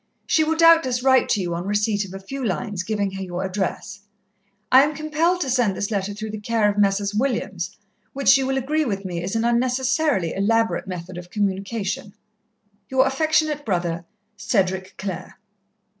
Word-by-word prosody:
She 315 - +3
will 320 +1 0
doubtless 325 -7 +5
write 260 -1 +4
to 205 - +2
you 175 -2 -2
on 175 +3 -4
receipt 210 0 +1
of 190 - -11
a - - -6
few 270 +8 -6
lines 195 -1 -2
giving 200 0 -1
her 195 0 -6
your 180 0 -4
address. 190 +1 -3 0.7
I 260 - +9
am 300 +2 +1
compelled 310 +4 0
to 275 - -1
send 240 -7 +1
this 205 +2 -2
letter 200 -1 -1
through 215 +1 -6
the 215 - -5
care 220 0 +1
of 205 0 0
Messrs. 200 0 +2
Williams, 205 -7 -2 0.3
which 275 0 +4
you 265 -1 +1
will 270 0 0
agree 300 +4 0
with 200 -7 -3
me 175 -2 -3
is 190 +5 -3
an 225 +1 +1
unnecessarily 250 - +1
elaborate 225 +2 +1
method 180 -1 -6
of 175 0 -11
communication. 200 +1 -2 0.7
"Your 265 0 +3
affectionate 305 +2 +1
brother, 175 -6 -1 0.3
"CEDRIC 190 -3 -1
CLARE." 190 -2 -6
210 Hz, 175 wpm, -23 LUFS, 190-265 Hz, 0.7 s, I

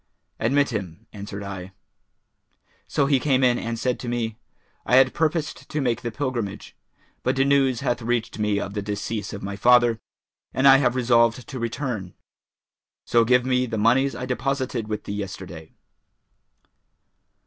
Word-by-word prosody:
'Admit 140 +4 +2
him,' 100 -1 -5
answered 100 -1 -7
I. 95 -1 -7 1.1
So 140 - +1
he 140 -1 +3
came 135 -1 +2
in 125 -1 +3
and 115 0 -3
said 125 +1 -1
to 120 - -5
me, 115 -2 -2 0.5
'I - - +4
had 130 -1 +5
purposed 160 -1 -1
to 155 - -2
make 120 -4 0
the 120 - -3
pilgrimage; 120 -5 -4 0.5
but - - 0
news 135 -2 +3
hath 120 0 -1
reached 115 -1 -2
me 105 -1 +1
of 100 - -5
the 105 - -2
decease 105 +1 -4
of 100 - -7
my 100 0 -4
father, 120 +1 +4 0.6
and 135 +1 +4
I 135 0 +9
have 130 -2 +1
resolved 120 -1 +2
to 130 - -6
return; 115 -5 -4 0.9
so 120 -1 +4
give 125 +2 +3
me 125 -1 +1
the 115 -1 -3
monies 125 +6 +3
I 125 - -4
deposited 130 -3 -2
with 105 -1 -4
thee - - -5
yesterday.' 95 -5 -7
120 Hz, 160 wpm, -24 LUFS, 105-130 Hz, 1.1 s, I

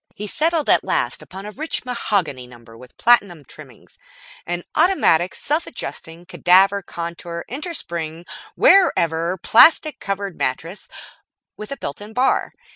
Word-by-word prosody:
He 210 - -6
settled 315 - 0
at - - +4
last - - -1
upon 190 +2 -10
a 210 - -7
rich 305 +3 -4
mahogany 190 - -2
number 120 -2 -16
with 125 +2 -16
platinum 200 -10 +2
trimmings, - - -15 0.5
an 175 0 -3
Automatic 185 - +2
Self 305 +3 -1
Adjusting 170 -7 -8
Cadaver 190 +2 +3
contour 170 -1 -7
Innerspring 175 - -5 0.3
Wearever 170 - +3
Plastic 305 - +5
Covered 195 -2 -4
Mattress 165 +9 -3 0.7
with 215 +3 -9
a 275 - -4
built 140 - -6
in 210 +2 -10
bar. 255 +3 0
190 Hz, 130 wpm, -20 LUFS, 165-240 Hz, 0.7 s, Plastic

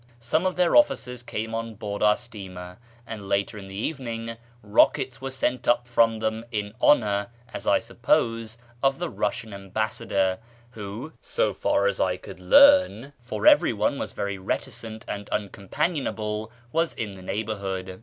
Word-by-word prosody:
Some 155 +10 0
of 185 - -2
their 180 -1 +3
officers 125 - +3
came 110 -2 -4
on 115 0 -4
board 100 0 -5
our 105 0 +5
steamer, 95 -6 -9 0.3
and 105 -4 -7
later 100 +2 0
in 95 - -10
the 95 - -9
evening 115 -1 -4 0.3
rockets 125 +5 +3
were 135 - -3
sent 125 -2 -1
up 120 0 +3
from 115 -2 +3
them 110 +1 -2
in 105 -2 -3
honour, 100 -7 +4 0.3
as - - -6
I - - +5
suppose, 115 -1 0 0.2
of 135 0 +2
the 175 -1 -3
Eussian 110 +1 -2
Ambassador, 95 -1 -1 0.3
who, 110 +6 -7
so - - 0
far - - +1
as - - +1
I - - +1
could - - -11
learn 280 - +6
(for 110 -3 -4
everyone - - +4
was - - -4
very 100 -1 -3
reticent 110 +2 -4
and 100 0 -5
uncom 100 -2 -4
panionable), 110 -9 -1 0.2
was 165 +1 0
in 105 -3 -4
the 95 - -11
neighbourhood. 95 -2 -4
110 Hz, 160 wpm, -25 LUFS, 100-125 Hz, 0.3 s, learn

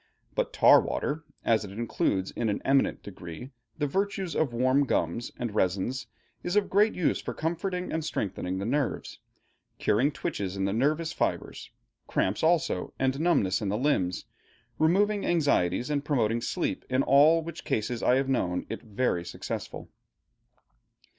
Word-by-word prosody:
But - - -1
tar - - +7
water, 155 +2 -3 0.2
as 110 -1 +3
it 100 - -7
includes 100 -3 -1
in 115 -2 -1
an 100 - -1
eminent 135 0 +2
degree 90 - -9 0.3
the 150 - 0
virtues 195 +3 -1
of 155 -5 +1
warm 130 +4 +2
gums 85 +7 -1
and 120 -3 -3
resins, 100 +6 0 0.3
is 175 +2 -2
of 210 -1 +2
great 210 +3 +4
use 175 - +1
for - - -5
comforting 180 +3 -2
and 160 - -1
strengthening 95 - -3
the 100 - -3
nerves, 140 +3 -2 0.6
curing 130 +8 +2
twitches 100 -8 -4
in 95 - 0
the 100 - 0
nervous 155 +7 +1
fibres, - - -2 0.4
cramps 95 +3 0
also, 165 0 +1
and 130 +1 0
numbness 115 - +2
in 100 - -1
the 105 - 0
limbs, 110 -10 0 0.5
removing 200 +6 +3
anxieties 140 - +1
and 145 -1 0
promoting 120 -6 +1
sleep, - - -2
in 130 +1 +2
all 155 +4 +5
which 170 0 -7
cases 115 +2 -2
I 125 - +4
have 135 0 +1
known 90 -9 0
it 115 - -5
very 105 -5 -1
successful. - - -6
130 Hz, 155 wpm, -28 LUFS, 105-160 Hz, 0.6 s, tar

